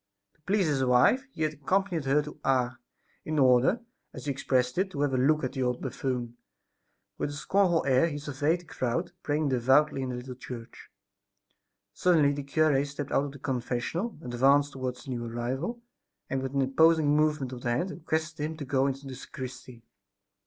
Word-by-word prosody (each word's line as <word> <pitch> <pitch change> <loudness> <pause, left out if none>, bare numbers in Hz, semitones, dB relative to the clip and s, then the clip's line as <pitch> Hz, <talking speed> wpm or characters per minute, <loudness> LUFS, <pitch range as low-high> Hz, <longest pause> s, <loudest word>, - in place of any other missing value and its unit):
To - - -36
please 200 -1 +2
his 145 -4 +1
wife 130 - +4
he 160 - -3
had 155 0 0
accompanied 175 +2 0
her 145 +2 +3
to 150 +1 -10
Ars, 130 -2 +2 0.5
in 155 0 -3
order, 130 - +4 0.3
as - - -8
he 145 - 0
expressed 130 +1 0
it, 190 0 +1
to 145 -6 -4
have 145 -2 +1
a - - +2
look 150 +4 +3
at 130 - -1
"the 135 - -3
old 125 -1 0
buffoon." 120 -3 -3 0.8
With - - -1
a - - -6
scornful 175 +3 +2
air 135 +4 +4
he 145 -3 -4
surveyed 145 +4 -1
the - - -19
crowd 155 +4 -2
praying 150 0 0
devoutly 135 +3 +3
in 130 - -3
the 125 - -3
little 125 +1 -6
church. 120 -2 -10 1.0
Suddenly 160 -6 +4
the 145 - -4
cure 140 0 +2
stepped 145 0 -6
out 140 - +2
of 140 - -6
the 140 - -11
confessional, 130 - -2
advanced 135 +4 +3
towards 130 -2 -4
the 135 - -7
new 120 -1 -3
arrival, 130 - -3 0.5
and, 135 - 0
with 135 +1 -4
an 135 - +3
imposing 155 +2 +4
movement 150 -4 +1
of 125 - -7
the 120 - -2
hand, 130 +11 0
requested 160 -3 -3
him 155 +1 -3
to 145 - -5
go 135 0 +2
into 135 +1 -4
the 135 - -6
sacristy. 130 -2 -9
140 Hz, 195 wpm, -28 LUFS, 130-155 Hz, 1.0 s, wife